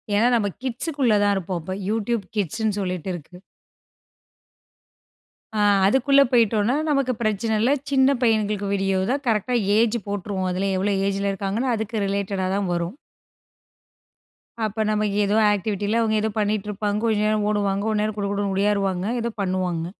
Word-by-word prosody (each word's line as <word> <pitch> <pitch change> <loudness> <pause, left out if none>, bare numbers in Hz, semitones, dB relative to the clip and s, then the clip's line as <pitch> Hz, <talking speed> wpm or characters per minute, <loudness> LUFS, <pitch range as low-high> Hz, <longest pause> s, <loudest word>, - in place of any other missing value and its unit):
ஏன்னா 225 +4 +4
நம்ம 210 -3 +1 0.2
கிட்ஸுக்குள்ள 260 0 0
தான் 205 - +3
இருப்போம். 185 -2 -3
அப்போ 185 +4 -5 0.2
Youtbe 225 -1 -1
கிட்ஸ்ன்னு 210 +2 -1
சொல்லிட்டு 185 -1 -3
இருக்கு. 175 +1 -10 2.2
அ. 210 - 0 0.3
அதுக்குள்ள 275 +4 +4
போயிட்டோன்னா 230 0 +3
நமக்கு 275 -3 +1
பிரச்சனை 220 +1 0
இல்ல. 245 +5 +3 0.2
சின்ன 270 0 +4
பையன்களுக்கு 210 -3 +1
வீடியோ 195 -1 +1
தான் 280 +2 -1
கரெக்ட்டா 225 +2 +1 0.2
ஏஜ் 230 +1 +3
போட்டுருவோம். 195 -2 -3
அதிலே 195 +2 -1
எவ்ளோ 200 +1 +1
ஏஜ் 200 0 -1
ல 200 - +1
இருக்காங்கன்னு, 205 +6 -1
அதுக்கு 220 -1 -3
ரிலேட்டடா 195 -1 -1
தான் 200 -2 -1
வரும். 175 +7 -3 1.7
அப்ப 220 +1 -1
நமக்கு 210 -1 0
ஏதோ 205 +1 +1 0.2
ஆக்டிவிட்டியில 205 +2 -1
அவங்க 220 -1 +1
ஏதோ 220 - 0
பண்ணிட்டு 210 -1 0
இருப்பாங்க, 210 0 -2
கொஞ்ச 220 -2 +1
நேரம் 215 -1 +1
ஓடுவாங்க, 200 -1 0
கொஞ்ச 215 -1 0
நேரம் 215 0 -1
குடு 200 -1 -1
குடுன்னு 200 -1 -1
உடியாறுவாங்க, 195 -2 0
ஏதோ 235 0 -2
பண்ணுவாங்க. 185 -3 -1
205 Hz, 150 wpm, -23 LUFS, 195-225 Hz, 2.2 s, ஏன்னா